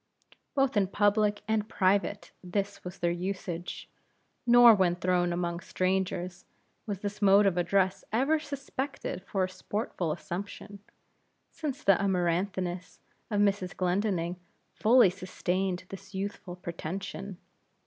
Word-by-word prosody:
Both 270 -2 +2
in 200 -2 +3
public 205 +1 +2
and 220 -1 0
private 200 +1 +1
this 200 +2 -3
was 180 +1 -7
their 175 -1 +1
usage; 175 -1 -4 0.6
nor 240 -1 +9
when 185 -4 +3
thrown 180 0 +1
among 170 0 -2
strangers, 185 -1 -1 0.4
was 200 -2 -3
this 205 0 -4
mode 200 +1 +6
of 195 -3 +3
address 190 +1 +1
ever 275 +8 +2
suspected 280 - -5
for 195 0 -1
a - - +1
sportful 185 -2 -3
assumption; 200 +5 -6 0.7
since 295 -2 -5
the 195 -1 +4
amaranthiness 180 -1 -1 0.3
of 205 -1 +1
Mrs. 195 -2 +1
Glendinning 180 -2 0 0.4
fully 230 -3 +5
sustained 185 0 -2
this 195 0 -10
youthful 195 -2 -4
pretension. 180 +2 -6
195 Hz, 120 wpm, -29 LUFS, 180-205 Hz, 0.7 s, nor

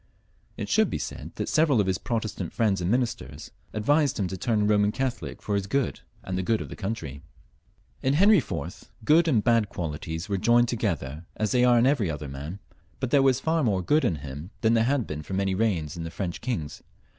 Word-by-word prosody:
It - - -4
should - - +3
be - - -2
said - - -6
that - - -3
several 155 -6 +3
of 100 - +3
his 95 0 0
Protestant 110 -7 -3
friends 100 -5 +1
and 85 - -1
ministers 110 - -2 0.2
advised 145 +6 +2
him 100 - 0
to 95 - -4
turn 105 +2 0
Eoman 105 -1 +3
Catholic 130 +1 -4
for 105 - -2
his 100 -1 0
good 135 +3 0 0.2
and 95 - -4
the 95 - 0
good 110 +4 +1
of - - -6
the - - -7
country. 95 - -5 0.8
In 135 0 +2
Henry 200 +4 +6
IV. 130 - -5 0.2
good 165 +5 +5
and 120 -10 +3
bad 115 -3 +3
qualities 80 +1 -4
were 100 -2 -1
joined 120 +3 +4
together 85 - -2
as 110 -1 -1
they 125 -1 +3
are 125 -1 +5
in 120 - +4
eveiy 125 - +2
other 75 -1 -5
man, 70 +7 -6 0.4
but 130 -2 -2
there 140 - +5
was 135 -2 +3
far 160 +2 +1
more 100 -6 +1
good 150 - +3
in 85 - +1
him 75 +3 -8
than 115 0 +3
there 115 -1 +3
had 135 -2 +1
been 75 0 -5
for 95 +5 -5
many 95 0 0
reigns 95 -8 0
in 85 - -5
the 80 - -5
French 85 0 -4
kings. 85 - -4
105 Hz, 220 wpm, -26 LUFS, 85-125 Hz, 0.8 s, Henry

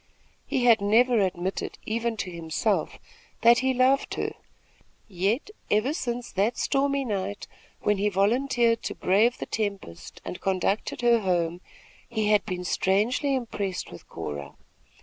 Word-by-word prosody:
He 250 -2 0
had 230 -3 +6
never 230 +4 +4
admitted 185 -1 -2
even 230 +1 -1
to 185 -3 -4
himself 165 -2 -1 0.5
that 235 +1 +7
he 260 0 +1
loved 260 +2 +2
her; - - -2 0.7
yet, 205 - -1 0.2
ever 215 +8 +2
since 245 -6 -4
that 205 +5 0
stormy 275 0 +1
night 205 -2 -3 0.4
when 210 -1 +1
he 205 +1 +2
volunteered 230 +4 +2
to - - -4
brave 215 +6 +3
the - - -5
tempest 200 - -5
and 180 - -6
conducted 195 +5 -1
her 240 -1 +4
home, 175 -3 0 0.5
he 220 -3 0
had 210 -1 +4
been 180 -2 -3
strangely 215 - +1
impressed 205 -7 -3
with 85 - -12
Cora. 70 -1 -6
215 Hz, 140 wpm, -26 LUFS, 190-245 Hz, 0.7 s, that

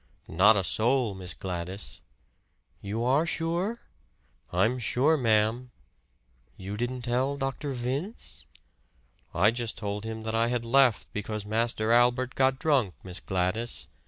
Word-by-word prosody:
"Not 100 +6 +5
a 95 - +1
soul, 120 +3 +1
Miss 95 -1 -7
Gladys." 90 -6 -5 0.8
"You 105 +4 -3
are 140 +6 +3
sure?" 170 +8 -1 0.7
"I'm 110 +8 +2
sure, 135 +6 +2
ma'am." 115 -1 +2 0.9
"You 100 +2 -6
didn't 120 +3 -3
tell 130 +4 0
Dr. 135 +1 -3
Vince?" 135 - -4 0.8
"I 105 - +4
just 120 -1 -3
told 105 0 -4
him 110 0 -5
that 110 0 -3
I 115 +1 +2
had 120 -1 -1
left 125 -2 +4
because 105 0 -4
Master 110 +1 0
Albert 125 +2 +3
got 130 0 +2
drunk, 135 - +1
Miss 90 -1 -6
Gladys. 95 +6 -1
115 Hz, 130 wpm, -28 LUFS, 105-130 Hz, 0.9 s, Not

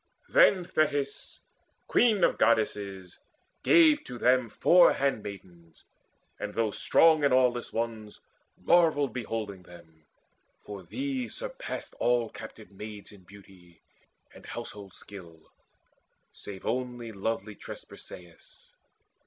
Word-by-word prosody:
Then 200 - +5
Thetis, 145 -4 -2 0.5
queen 220 -5 +3
of - - +2
Goddesses, 100 -5 0 0.4
gave 320 -4 +5
to 125 - -8
them 125 -1 +2
Four 175 +10 +5
handmaids; 95 - -5 0.6
and - - -5
those 110 -2 -1
strong 160 -2 +4
and 140 - +3
aweless 125 -1 +2
ones 110 -2 -4 0.4
Marvelled 160 -5 +3
beholding 110 -6 -5
them, 80 -3 -17 0.6
for 100 -2 -8
these 265 - -4
surpassed - - -6
All 120 -2 +1
captive 110 -1 -11
maids 105 +1 -10
in 100 -3 -17
beauty 95 -3 -18 0.5
and - - -14
household 100 -2 -8
skill, 85 -5 -13 0.8
Save 95 -2 -10
only 120 -1 -3
lovely 105 0 -3
tressed - - -10
Briseis. 85 -2 -14
110 Hz, 110 wpm, -28 LUFS, 100-140 Hz, 0.8 s, Then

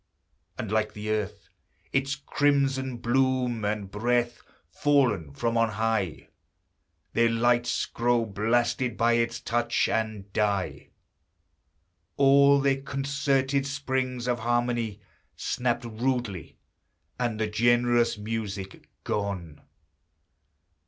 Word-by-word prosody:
And 110 - -4
like 110 -1 0
the 105 +1 -4
earth, 105 -3 -3 0.5
its 140 0 +1
crimson 135 -2 0
bloom 125 -1 +1
and 105 -2 -2
breath; 120 +3 0 0.3
Fallen 120 - +2
from 115 +10 -2
on 115 0 +3
high, 110 -6 -1 0.8
Their 115 +1 +4
lights 120 +1 +1
grow 120 0 +1
blasted 120 +4 0
by 115 +1 +3
its 115 0 0
touch, 120 +1 0
and 110 -3 -2
die! 100 -3 -1 1.3
All 140 0 +6
their 135 -1 +1
concerted 135 0 0
springs 130 -3 -2
of 120 -1 0
harmony 120 -2 -1 0.3
Snapped 120 -1 -1
rudely, 115 - -3 0.6
and 120 -3 -1
the 110 - +1
generous 120 +2 +2
music 105 -3 -5
gone. 95 -7 -3
120 Hz, 100 wpm, -27 LUFS, 110-130 Hz, 1.3 s, All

